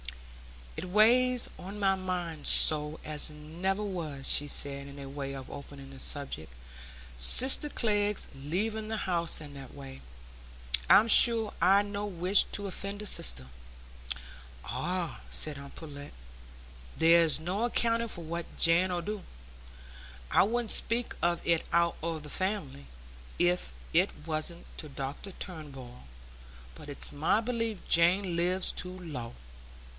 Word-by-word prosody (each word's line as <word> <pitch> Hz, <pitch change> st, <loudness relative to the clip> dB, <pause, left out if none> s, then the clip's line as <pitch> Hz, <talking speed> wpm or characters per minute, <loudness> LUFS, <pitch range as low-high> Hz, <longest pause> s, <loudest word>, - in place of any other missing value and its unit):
"It -, -, -6 dB
weighs 240 Hz, +6 st, +3 dB
on 195 Hz, +3 st, -8 dB
my 195 Hz, -1 st, +2 dB
mind 180 Hz, -5 st, -4 dB
so 150 Hz, 0 st, +6 dB
as 150 Hz, 0 st, +1 dB
never 170 Hz, +7 st, -4 dB
was," 160 Hz, -9 st, -4 dB
she 145 Hz, -, +5 dB
said, 140 Hz, -1 st, -2 dB
by 140 Hz, -1 st, -9 dB
way 135 Hz, 0 st, -6 dB
of 135 Hz, -1 st, -9 dB
opening 140 Hz, -1 st, -10 dB
the 135 Hz, -, -12 dB
subject, 135 Hz, -, -5 dB, 0.7 s
"sister 260 Hz, -, +4 dB
Glegg's 210 Hz, -5 st, -1 dB
leaving 210 Hz, +10 st, -3 dB
the 220 Hz, 0 st, -3 dB
house 170 Hz, -3 st, +1 dB
in 145 Hz, -2 st, -11 dB
that 135 Hz, -2 st, -11 dB
way. 135 Hz, -1 st, -11 dB, 0.9 s
I'm 215 Hz, -, +7 dB
sure 230 Hz, -1 st, +6 dB
I'd 200 Hz, +2 st, +4 dB
no 205 Hz, 0 st, -5 dB
wish 185 Hz, +1 st, +4 dB
t' 205 Hz, -, -2 dB
offend 200 Hz, +2 st, -5 dB
a -, -, -8 dB
sister." 65 Hz, -, 0 dB, 1.2 s
"Ah," 170 Hz, -, -4 dB
said 150 Hz, -2 st, 0 dB
aunt 140 Hz, 0 st, -12 dB
Pullet, 145 Hz, -3 st, -10 dB, 0.8 s
"there's 165 Hz, -3 st, +5 dB
no 185 Hz, +8 st, -2 dB
accounting 230 Hz, -1 st, -1 dB
for 175 Hz, -6 st, -5 dB
what 170 Hz, +1 st, -7 dB
Jane 170 Hz, +3 st, +4 dB
'ull 175 Hz, -1 st, -3 dB
do. 210 Hz, +2 st, -5 dB, 1.1 s
I -, -, +5 dB
wouldn't 230 Hz, +2 st, 0 dB
speak 235 Hz, +1 st, +1 dB
of 170 Hz, 0 st, 0 dB
it 170 Hz, -1 st, 0 dB
out 170 Hz, 0 st, +2 dB
o' 165 Hz, 0 st, -3 dB
the 150 Hz, -1 st, -10 dB
family, 185 Hz, -, -4 dB, 0.5 s
if 175 Hz, +1 st, 0 dB, 0.2 s
it 180 Hz, +4 st, +4 dB, 0.2 s
wasn't 160 Hz, +2 st, -4 dB
to 155 Hz, -, -7 dB
Dr 140 Hz, +7 st, -7 dB
Turnbull; 135 Hz, -, -10 dB, 0.7 s
but 105 Hz, -, -12 dB
it's 145 Hz, -, +2 dB
my 155 Hz, +8 st, +1 dB
belief 230 Hz, -3 st, -4 dB
Jane 175 Hz, +2 st, +3 dB
lives 180 Hz, +2 st, +2 dB
too 180 Hz, +1 st, -6 dB
low. 135 Hz, -10 st, -8 dB
170 Hz, 140 wpm, -29 LUFS, 145-200 Hz, 1.2 s, I'm